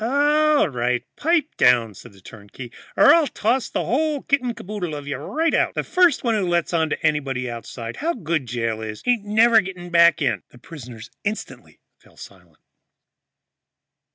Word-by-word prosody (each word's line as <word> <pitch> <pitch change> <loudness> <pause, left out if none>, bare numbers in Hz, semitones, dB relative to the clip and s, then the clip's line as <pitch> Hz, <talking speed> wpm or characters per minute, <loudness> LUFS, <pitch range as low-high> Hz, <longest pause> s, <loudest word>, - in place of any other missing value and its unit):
"All 295 +3 +3
right, 125 -3 -1
pipe 320 -1 0
down," 120 -3 +3
said 100 - -14
the 95 - -19
turnkey, 110 +5 -12 0.3
"or - - +7
I'll 330 -3 +3
toss 245 +2 -1
the - - -3
whole 295 +2 -1
kit 280 -1 +1
and 245 -2 -4
caboodle 180 -5 -5
of 145 -1 -8
you 145 - -3
right 325 +1 -1
out. - - +1
And - - -2
first 360 -6 +2
one 235 -2 +1
who 205 -4 0
lets 175 0 0
on 160 -2 +1
to - - -4
anybody 135 -5 -1
outside 115 0 -7
how 335 +4 -2
good 160 - -3
jail 115 -2 -3
is 110 -1 -7
ain't 240 -4 +1
never 225 +2 +4
getting 180 -1 -9
back 170 -2 +5
in!" 115 - -1
The - - -18
prisoners 125 -4 -11
instantly 210 +1 -6 0.2
fell - - -24
silent. - - -15
170 Hz, 180 wpm, -22 LUFS, -, 0.3 s, or